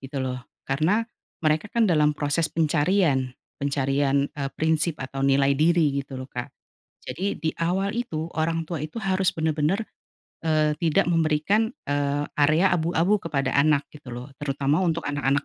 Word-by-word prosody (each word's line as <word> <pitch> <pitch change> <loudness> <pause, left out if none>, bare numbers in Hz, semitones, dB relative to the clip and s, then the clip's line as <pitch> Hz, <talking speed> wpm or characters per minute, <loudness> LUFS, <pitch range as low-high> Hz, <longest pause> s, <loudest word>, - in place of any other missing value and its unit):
gitu 135 +1 -6
loh 125 -1 -3 0.3
karena, 160 +11 +2 0.4
mereka 155 +5 +2
kan 235 -1 +3
dalam 150 -3 +3
proses 155 +3 0
pencarian 155 -3 +2 0.3
pencarian, 140 0 +1
eee, 140 -1 -3
prinsip 160 0 +1
atau 135 +1 -5
nilai 135 0 +4
diri 160 0 +3
gitu 135 -1 -9
loh 130 - -6
Kak, 120 0 -4 0.6
jadi 195 +2 -2
di 160 - -1
awal 190 +4 0
itu 165 -10 -3
orang 165 +1 0
tua 170 -4 -3
itu 155 +7 -7
harus 190 -1 +1
benar-benar, 160 +6 0 0.6
eee, 155 -1 +2
tidak 170 +3 +2
memberikan, 165 +7 +2 0.2
eee, 145 0 0
area 155 +6 +4
abu-abu 170 +4 +2
kepada 140 -5 -1
anak 145 0 +3
gitu 145 -4 -11
loh 125 +3 -7
terutama 145 +3 0
untuk 165 -1 0
anak-anak 145 -1 0
155 Hz, 150 wpm, -25 LUFS, 140-165 Hz, 0.6 s, nilai